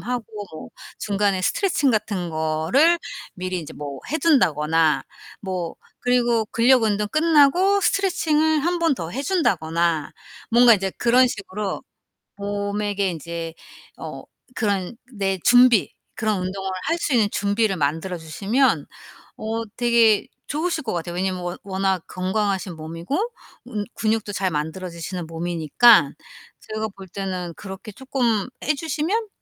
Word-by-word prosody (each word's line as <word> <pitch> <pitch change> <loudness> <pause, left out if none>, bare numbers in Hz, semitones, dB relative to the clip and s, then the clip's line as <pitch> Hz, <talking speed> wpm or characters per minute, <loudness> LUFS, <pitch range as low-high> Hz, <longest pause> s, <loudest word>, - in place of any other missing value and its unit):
하고 245 0 -3 0.3
뭐 155 - -8 0.3
중간에 200 -2 0
스트레칭 320 - +2
같은 200 -6 -1
거를 160 - +2 0.4
미리 185 0 -3
인제 160 -4 -8
뭐 140 -2 -7
해 310 - +1
둔다거나 160 - +3 0.4
뭐 185 -4 -3 0.2
그리고 240 -2 +2
근력 245 +2 +4
운동 210 -1 +1
끝나고 330 - +4
스트레칭을 315 -5 +2
1 350 +1 +1
번 330 -3 +2
더 165 -8 -6
해 265 +9 -3
준다거나 170 - 0 0.4
뭔가 240 +1 +7
이제 195 -1 -1
그런 245 +2 +5
식으로 200 -3 -4 0.6
몸에게 205 0 -1
인제 165 0 -5 0.4
어 - - -7 0.3
그런 200 -1 -1 0.2
내 195 -2 -1
준비 245 -3 +5 0.2
그런 215 -3 0
운동을 190 +1 -3
할 330 - 0
수 300 - -1
있는 225 -4 +4
준비를 205 0 +1
만들어 160 +5 -1
주시면 195 - +1 0.5
어 225 +1 -3
되게 235 -3 +4 0.2
좋으실 315 +1 -1
것 230 - -3
같아요. 175 0 -4
왜냐하면 185 0 -1
워 175 0 -4
워낙 190 -2 -1
건강하신 190 -1 -1
몸이고 165 - -4 0.5
음 210 -4 -2
근육도 220 -1 0
잘 190 -1 0
만들어지시는 170 +3 -4
몸이니까 165 +2 +4 0.5
제가 215 0 -4
볼 195 -1 -11
때는 185 -2 -4
그렇게 200 +2 -8
쪼끔 240 -4 -1 0.2
해 300 - +1
주시면 325 +9 -1
205 Hz, 280 characters per minute, -23 LUFS, 175-245 Hz, 0.6 s, 뭔가